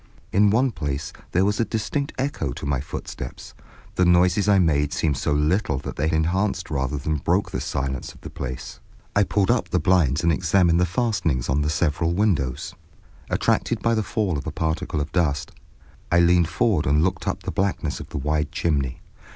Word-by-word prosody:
In 105 Hz, +2 st, +5 dB
one 125 Hz, +5 st, +3 dB
place 75 Hz, -5 st, -4 dB, 0.2 s
there 95 Hz, +2 st, +3 dB
was 105 Hz, 0 st, 0 dB
a -, -, +4 dB
distinct 120 Hz, +6 st, -2 dB
echo 130 Hz, -, -2 dB
to -, -, -7 dB
my 70 Hz, -2 st, 0 dB
footsteps, 70 Hz, -, -7 dB, 0.4 s
the 90 Hz, -, +2 dB
noises 90 Hz, +3 st, +4 dB
I 100 Hz, -, +5 dB
made 75 Hz, -5 st, +2 dB
seemed 75 Hz, -3 st, 0 dB
so -, -, -1 dB
little 75 Hz, +3 st, +1 dB
that -, -, -6 dB
they 80 Hz, -, 0 dB
enhanced 90 Hz, +4 st, 0 dB
rather 70 Hz, 0 st, -1 dB
than 75 Hz, +3 st, -1 dB
broke 95 Hz, +6 st, 0 dB
the -, -, -3 dB
silence 65 Hz, -2 st, -3 dB
of -, -, -18 dB
the -, -, -9 dB
place. 65 Hz, -2 st, -6 dB, 0.4 s
I 100 Hz, -, +5 dB
pulled 100 Hz, -1 st, +2 dB
up -, -, 0 dB
the -, -, +1 dB
blinds 85 Hz, -5 st, +2 dB
and 85 Hz, -, +4 dB
examined 85 Hz, +1 st, +3 dB
the 90 Hz, -, +3 dB
fastenings 90 Hz, -, 0 dB
of 70 Hz, +3 st, +2 dB
the 75 Hz, -, 0 dB
several 80 Hz, +1 st, 0 dB
windows. 85 Hz, -, 0 dB, 0.6 s
Attracted -, -, 0 dB
by 115 Hz, -, +3 dB
the 110 Hz, -, +1 dB
fall 105 Hz, -7 st, -1 dB
of 70 Hz, -, -8 dB
a -, -, -2 dB
particle 80 Hz, 0 st, -2 dB
of 75 Hz, -, -4 dB
dust, 75 Hz, -5 st, 0 dB, 0.6 s
I 85 Hz, -, +5 dB
leaned 85 Hz, -1 st, +4 dB
forward 95 Hz, -8 st, +1 dB
and 75 Hz, +3 st, +3 dB
looked 95 Hz, -, -1 dB
up -, -, -2 dB
the -, -, -3 dB
blackness 95 Hz, 0 st, -1 dB
of -, -, -9 dB
the -, -, -5 dB
wide 75 Hz, +1 st, -1 dB
chimney. 75 Hz, -7 st, -1 dB
85 Hz, 195 wpm, -23 LUFS, 75-95 Hz, 0.6 s, In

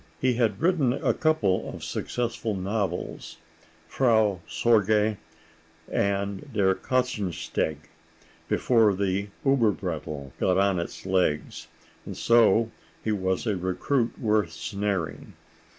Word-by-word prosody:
He 130 Hz, -1 st, +2 dB
had 115 Hz, -4 st, 0 dB
written 155 Hz, -7 st, +2 dB
a -, -, +1 dB
couple 115 Hz, -13 st, +1 dB
of -, -, -9 dB
successful 115 Hz, -3 st, -3 dB
novels, 95 Hz, -, -3 dB, 0.5 s
"Frau 110 Hz, -3 st, +2 dB
Sorge" 105 Hz, +3 st, +2 dB, 0.7 s
and 100 Hz, 0 st, -1 dB
"Der 100 Hz, -3 st, +3 dB
Katzensteg," 105 Hz, -, -1 dB, 0.7 s
before 110 Hz, -5 st, +3 dB
the 100 Hz, +1 st, -1 dB, 0.2 s
Uberbrettl' 90 Hz, -, 0 dB
got 90 Hz, 0 st, +2 dB
on 100 Hz, -2 st, +2 dB
its 85 Hz, -, -6 dB
legs, 90 Hz, -5 st, 0 dB, 0.4 s
and -, -, -8 dB
so 115 Hz, -1 st, +4 dB, 0.3 s
he 110 Hz, -, 0 dB
was 95 Hz, -1 st, -1 dB
a 105 Hz, -3 st, +1 dB
recruit 115 Hz, +7 st, -1 dB
worth 105 Hz, -7 st, +1 dB
snaring. 90 Hz, +2 st, -3 dB
100 Hz, 105 wpm, -26 LUFS, 95-115 Hz, 0.7 s, so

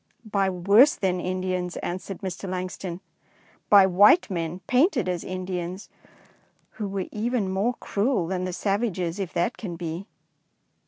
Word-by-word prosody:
" -, -, -40 dB
By 200 Hz, -3 st, +1 dB
worse 200 Hz, +10 st, +5 dB
than 185 Hz, -2 st, 0 dB
Indians," 185 Hz, -1 st, -2 dB
answered 185 Hz, +1 st, -5 dB
Mr. 190 Hz, 0 st, -5 dB
Langston, 185 Hz, -1 st, -5 dB, 0.2 s
— -, -, -34 dB
" -, -, -33 dB
by 200 Hz, -2 st, +8 dB
white 205 Hz, -, +5 dB
men 170 Hz, 0 st, -3 dB
painted 255 Hz, -, +2 dB
as 180 Hz, -2 st, -2 dB
Indians, 185 Hz, 0 st, -5 dB, 0.8 s
who 210 Hz, -, -5 dB
were 195 Hz, -1 st, -3 dB
even 220 Hz, -2 st, -1 dB
more 210 Hz, +6 st, 0 dB
cruel 210 Hz, -3 st, 0 dB
than 185 Hz, +1 st, -2 dB
the 185 Hz, -, -3 dB
savages, 195 Hz, -2 st, -1 dB
if 190 Hz, -3 st, -3 dB
that 175 Hz, +8 st, 0 dB
can 185 Hz, -6 st, -6 dB
be." 170 Hz, +3 st, -5 dB
190 Hz, 155 wpm, -25 LUFS, 180-205 Hz, 0.8 s, by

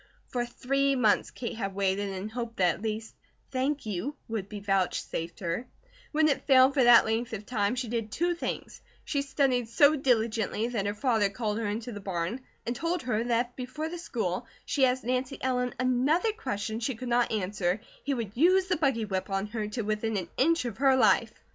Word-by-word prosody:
For 240 Hz, -1 st, -1 dB
three 275 Hz, +3 st, +1 dB
months 225 Hz, -5 st, +3 dB
Kate 240 Hz, -1 st, -5 dB
had 195 Hz, -3 st, -3 dB
waited 200 Hz, 0 st, 0 dB
and 195 Hz, +2 st, -5 dB
hoped 235 Hz, -1 st, -5 dB
that 180 Hz, -2 st, +4 dB
at -, -, -11 dB
least 220 Hz, 0 st, -3 dB, 0.4 s
"thank 275 Hz, +2 st, -1 dB
you" 215 Hz, +8 st, -3 dB
would 215 Hz, -3 st, -4 dB
be 210 Hz, -, -6 dB
vouchsafed 190 Hz, -4 st, -1 dB
her; 175 Hz, +8 st, -2 dB, 0.4 s
when 310 Hz, 0 st, +3 dB
it 285 Hz, -, 0 dB
failed 265 Hz, 0 st, +6 dB
for 270 Hz, -2 st, +3 dB
that 240 Hz, -1 st, +8 dB
length 225 Hz, +1 st, -1 dB
of 210 Hz, -1 st, -5 dB
time 210 Hz, -1 st, 0 dB
she 250 Hz, -1 st, -3 dB
did 225 Hz, -2 st, -3 dB
two 345 Hz, +8 st, +1 dB
things: 340 Hz, -, -5 dB, 0.2 s
she 280 Hz, -, 0 dB
studied 270 Hz, -4 st, +1 dB
so 285 Hz, +5 st, +5 dB
diligently 230 Hz, -4 st, +1 dB
that 210 Hz, -5 st, -1 dB
her 205 Hz, -, -2 dB
father 220 Hz, -4 st, +2 dB
called 210 Hz, +1 st, -2 dB
her 225 Hz, -, -1 dB
into 225 Hz, +4 st, -3 dB
the 205 Hz, -, -6 dB
barn 190 Hz, +4 st, -3 dB, 0.2 s
and 240 Hz, -, -2 dB
told 335 Hz, +3 st, -1 dB
her 230 Hz, -3 st, 0 dB
that 240 Hz, 0 st, +1 dB
if -, -, -37 dB
before 265 Hz, +5 st, -4 dB
the 350 Hz, +1 st, -6 dB
school, 225 Hz, -, -3 dB, 0.2 s
she 270 Hz, -3 st, +3 dB
asked 255 Hz, +1 st, -1 dB
Nancy 255 Hz, +3 st, -1 dB
Ellen 250 Hz, -1 st, -1 dB
another 260 Hz, -, +2 dB
question 220 Hz, -, -3 dB
she 240 Hz, +2 st, -2 dB
could 250 Hz, +3 st, -7 dB
not 240 Hz, 0 st, +2 dB
answer, 195 Hz, -2 st, 0 dB, 0.2 s
he 280 Hz, 0 st, 0 dB
would 220 Hz, -4 st, -4 dB
use 365 Hz, +7 st, +4 dB
the 365 Hz, -, +2 dB
buggy 270 Hz, -7 st, +1 dB
whip 190 Hz, -1 st, -3 dB
on 195 Hz, 0 st, -1 dB
her 215 Hz, -2 st, -2 dB
to 220 Hz, +2 st, -3 dB
within 215 Hz, +1 st, -1 dB
an 175 Hz, -3 st, -4 dB
inch 330 Hz, +2 st, +2 dB
of 240 Hz, -, -5 dB
her 270 Hz, -1 st, +5 dB
life. 220 Hz, -1 st, +4 dB
235 Hz, 205 wpm, -29 LUFS, 210-260 Hz, 0.4 s, that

